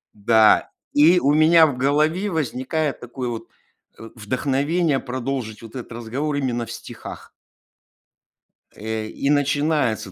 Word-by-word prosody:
да, 110 Hz, +1 st, +4 dB, 0.2 s
и 165 Hz, +5 st, +5 dB
у 145 Hz, -1 st, +2 dB
меня 160 Hz, +1 st, +6 dB
в 140 Hz, -, -3 dB
голове 155 Hz, +9 st, +1 dB
возникает 150 Hz, -1 st, -2 dB
такое 125 Hz, +1 st, -6 dB
вот, 115 Hz, -2 st, -6 dB, 0.5 s
э, 115 Hz, 0 st, -10 dB
вдохновение 140 Hz, -, 0 dB
продолжить 125 Hz, -3 st, -4 dB
вот 115 Hz, +2 st, -12 dB
этот 125 Hz, -, -8 dB
разговор 125 Hz, +6 st, -3 dB
именно 120 Hz, -4 st, -2 dB
в 115 Hz, -, -10 dB
стихах. 115 Hz, -, -10 dB, 1.4 s
Э, 110 Hz, 0 st, -4 dB
и 140 Hz, +5 st, -3 dB
начинается 145 Hz, -7 st, +1 dB
135 Hz, 125 wpm, -22 LUFS, 115-150 Hz, 1.4 s, меня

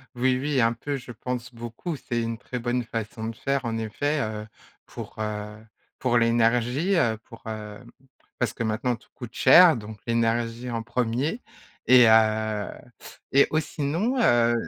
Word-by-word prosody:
Oui, 130 Hz, +1 st, +2 dB
oui, 140 Hz, -1 st, +1 dB
un 115 Hz, 0 st, +3 dB
peu, 140 Hz, +5 st, -4 dB
je 125 Hz, -2 st, -8 dB
pense 125 Hz, +1 st, -5 dB
beaucoup, 120 Hz, +8 st, -5 dB
c'est 120 Hz, -4 st, -3 dB
une 115 Hz, 0 st, -3 dB
très 125 Hz, +2 st, -6 dB
bonne 120 Hz, +1 st, -1 dB
façon 115 Hz, 0 st, -5 dB
de 115 Hz, -, -7 dB
faire, 135 Hz, +2 st, -1 dB
en 115 Hz, -1 st, -2 dB
effet, 145 Hz, +8 st, -1 dB
heu, 110 Hz, -2 st, -4 dB, 0.4 s
pour, -, -, -9 dB
heu, 105 Hz, -1 st, -4 dB, 0.4 s
pour 120 Hz, -2 st, +2 dB
l'énergie, 120 Hz, -, +2 dB
heu, 115 Hz, -8 st, +2 dB
pour, 115 Hz, -, -14 dB
heu, 105 Hz, -1 st, -6 dB, 0.6 s
parce 125 Hz, -, -1 dB
que -, -, -4 dB
maintenant, 115 Hz, +2 st, -1 dB
tout -, -, -25 dB
coûte 120 Hz, -3 st, -9 dB
cher, 175 Hz, -4 st, +7 dB
donc 110 Hz, -1 st, -8 dB
l'énergie 115 Hz, +1 st, 0 dB
en 115 Hz, -1 st, -3 dB
1er 125 Hz, -, -1 dB, 0.4 s
et 125 Hz, -1 st, +8 dB
heu, 110 Hz, -1 st, +3 dB, 0.6 s
et 140 Hz, +1 st, +6 dB
ou 155 Hz, -, +2 dB
sinon, 160 Hz, -, -2 dB
heu 120 Hz, -, +4 dB
120 Hz, 165 wpm, -25 LUFS, 115-130 Hz, 0.6 s, et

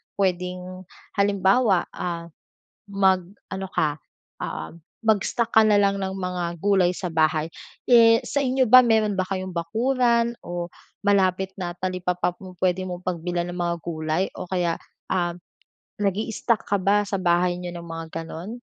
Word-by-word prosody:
puwedeng, 185 Hz, -1 st, -2 dB, 0.3 s
halimbawa, 200 Hz, 0 st, +3 dB
ah, 170 Hz, -1 st, -4 dB, 0.6 s
mag 190 Hz, -2 st, +3 dB, 0.3 s
ano 190 Hz, 0 st, -4 dB
ka, 150 Hz, -1 st, 0 dB, 0.4 s
oo, 80 Hz, +2 st, -4 dB, 0.4 s
mag-stock 220 Hz, +2 st, +1 dB
ka 220 Hz, -, +8 dB
na 210 Hz, -1 st, +5 dB
lang 200 Hz, 0 st, +2 dB
ng 190 Hz, 0 st, -2 dB
mga 180 Hz, -2 st, -3 dB
gulay 195 Hz, -3 st, +3 dB
sa 185 Hz, -, -4 dB
bahay. 155 Hz, -1 st, +2 dB, 0.4 s
Eh, 230 Hz, -2 st, +7 dB
sa 285 Hz, -, 0 dB
inyo 260 Hz, 0 st, +2 dB
ba, 255 Hz, +2 st, +10 dB
meron 215 Hz, -2 st, +3 dB
ba -, -, +3 dB
kayong 185 Hz, -1 st, -3 dB
bakuran 235 Hz, +6 st, +1 dB
o 175 Hz, 0 st, -4 dB, 0.4 s
malapit 190 Hz, -1 st, +2 dB
na 175 Hz, -2 st, -3 dB
talipapa 180 Hz, -1 st, -1 dB
pu-pwede 185 Hz, 0 st, -2 dB
mong 180 Hz, 0 st, -6 dB
pagbilhan 175 Hz, 0 st, -2 dB
ng 175 Hz, -, -7 dB
mga 170 Hz, 0 st, 0 dB
gulay? 160 Hz, +2 st, -1 dB
O -, -, -6 dB
kaya, 175 Hz, -3 st, 0 dB, 0.3 s
ah, 175 Hz, -2 st, 0 dB, 0.7 s
nag-i-stock 215 Hz, +3 st, 0 dB
ka 200 Hz, -, +2 dB
ba 205 Hz, +2 st, +3 dB
sa 195 Hz, 0 st, -1 dB
bahay 175 Hz, 0 st, +2 dB
niyo 175 Hz, -1 st, -6 dB
ng 170 Hz, -, -7 dB
mga 165 Hz, 0 st, -6 dB
gano'n? 190 Hz, +9 st, -7 dB
185 Hz, 145 wpm, -24 LUFS, 175-205 Hz, 0.7 s, ba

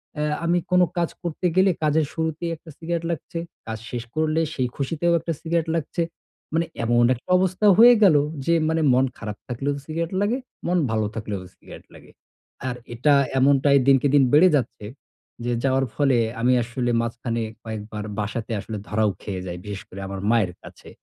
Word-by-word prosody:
অ্যা 150 Hz, -, -1 dB, 0.2 s
আমি 170 Hz, +1 st, +2 dB
কোন 180 Hz, 0 st, +5 dB, 0.2 s
কাজ 170 Hz, -1 st, +1 dB
করতে 170 Hz, +1 st, -4 dB
গেলে 190 Hz, 0 st, +5 dB
কাজের 155 Hz, 0 st, +2 dB
শুরুতেই 160 Hz, +1 st, -2 dB
একটা 160 Hz, -, -16 dB
সিগারেট 170 Hz, 0 st, -3 dB
লাগছে, 165 Hz, +1 st, -5 dB, 0.3 s
কাজ 110 Hz, 0 st, -4 dB
শেষ 120 Hz, -2 st, -3 dB
করলে 155 Hz, 0 st, +1 dB
সেই 130 Hz, -2 st, 0 dB
খুশিতেও 165 Hz, +5 st, 0 dB
একটা 165 Hz, -, -4 dB
সিগারেট 165 Hz, 0 st, -1 dB
লাগছে। 165 Hz, +2 st, -2 dB, 0.5 s
মানে 165 Hz, +1 st, +2 dB, 0.2 s
এমন 120 Hz, +1 st, +3 dB
একটা 120 Hz, -, -17 dB
অবস্থা 185 Hz, +3 st, 0 dB
হয়ে 240 Hz, +2 st, +9 dB
গেল 175 Hz, -6 st, +7 dB, 0.3 s
যে 170 Hz, -, +3 dB, 0.2 s
মানে 160 Hz, 0 st, +1 dB
মন 130 Hz, +1 st, +4 dB
খারাপ 105 Hz, -1 st, -6 dB
থাকলেও 135 Hz, +4 st, -2 dB
সিগারেট 165 Hz, +2 st, -3 dB
লাগে, 225 Hz, +5 st, +1 dB, 0.3 s
মন 180 Hz, +1 st, +2 dB
ভালো 110 Hz, -1 st, +1 dB
থাকলেও 105 Hz, -3 st, -4 dB
সিগারেট -, -, -13 dB
লাগে। -, -, -15 dB, 0.6 s
আর 125 Hz, -, -2 dB, 0.2 s
এটা 145 Hz, +5 st, +3 dB, 0.3 s
এমনটাই 140 Hz, +1 st, +4 dB
দিনকে 135 Hz, 0 st, +5 dB
দিন 140 Hz, -, +6 dB
বেড়ে 180 Hz, +5 st, +7 dB
যাচ্ছে 120 Hz, -5 st, -2 dB, 0.6 s
যে 120 Hz, -, 0 dB
যাওয়ার 135 Hz, 0 st, +2 dB
ফলে 140 Hz, -4 st, +3 dB, 0.2 s
আমি 125 Hz, +2 st, +4 dB
আসলে 120 Hz, +1 st, -2 dB
মাঝখানে 115 Hz, 0 st, -3 dB, 0.2 s
কয়েকবার 110 Hz, -1 st, -6 dB, 0.2 s
বাসাতে 105 Hz, +2 st, -3 dB
আসলে 110 Hz, -2 st, -6 dB
ধরাও 105 Hz, 0 st, +1 dB
খেয়ে 95 Hz, -3 st, -5 dB
যাই, 90 Hz, 0 st, -5 dB
বিশেষ 100 Hz, -2 st, -5 dB
করে 95 Hz, -, -9 dB
আমার 95 Hz, 0 st, -5 dB
মায়ের 110 Hz, -6 st, +2 dB
কাছে। -, -, -13 dB
140 Hz, 175 wpm, -23 LUFS, 115-165 Hz, 0.6 s, হয়ে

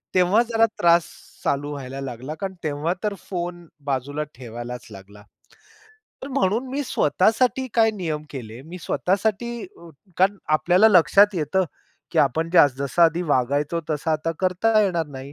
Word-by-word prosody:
तेव्हा 185 Hz, +5 st, +4 dB
जरा 225 Hz, 0 st, +4 dB
त्रास 170 Hz, -1 st, +4 dB, 0.4 s
चालू 145 Hz, +1 st, -1 dB
व्हायला 135 Hz, -1 st, -6 dB
लागला, 130 Hz, +3 st, -6 dB
कारण 195 Hz, -1 st, -4 dB
तेव्हा 155 Hz, +3 st, -1 dB
तर 210 Hz, -1 st, 0 dB, 0.2 s
फोन 175 Hz, -2 st, -5 dB, 0.2 s
बाजूला 140 Hz, +2 st, -2 dB
ठेवायलाच 120 Hz, 0 st, -8 dB
लागला. 100 Hz, +1 st, -13 dB, 1.0 s
तर 275 Hz, -, -6 dB
म्हणून 225 Hz, +1 st, +1 dB
मी 285 Hz, +2 st, -2 dB
स्वतःसाठी 235 Hz, -, +1 dB
काय 225 Hz, -1 st, +4 dB
नियम 160 Hz, -6 st, -3 dB
केले, 120 Hz, -3 st, -8 dB
मी 175 Hz, +4 st, -9 dB
स्वतःसाठी, 210 Hz, -, -1 dB
अ, 170 Hz, -, -14 dB, 0.3 s
कारण 195 Hz, +2 st, +3 dB, 0.2 s
आपल्याला 185 Hz, +7 st, +4 dB
लक्षात 195 Hz, +3 st, +5 dB
येतं, 175 Hz, +4 st, 0 dB, 0.5 s
की -, -, -1 dB
आपण 160 Hz, +5 st, +2 dB, 0.3 s
जसं 140 Hz, +5 st, +1 dB
आधी 165 Hz, +2 st, +4 dB
वागायचो 145 Hz, +5 st, +1 dB
तसा 155 Hz, +2 st, -1 dB
आता 160 Hz, +2 st, -1 dB
करता 205 Hz, +4 st, +2 dB
येणार 170 Hz, -5 st, 0 dB
नाही. 135 Hz, 0 st, -9 dB
165 Hz, 145 wpm, -23 LUFS, 140-195 Hz, 1.0 s, लक्षात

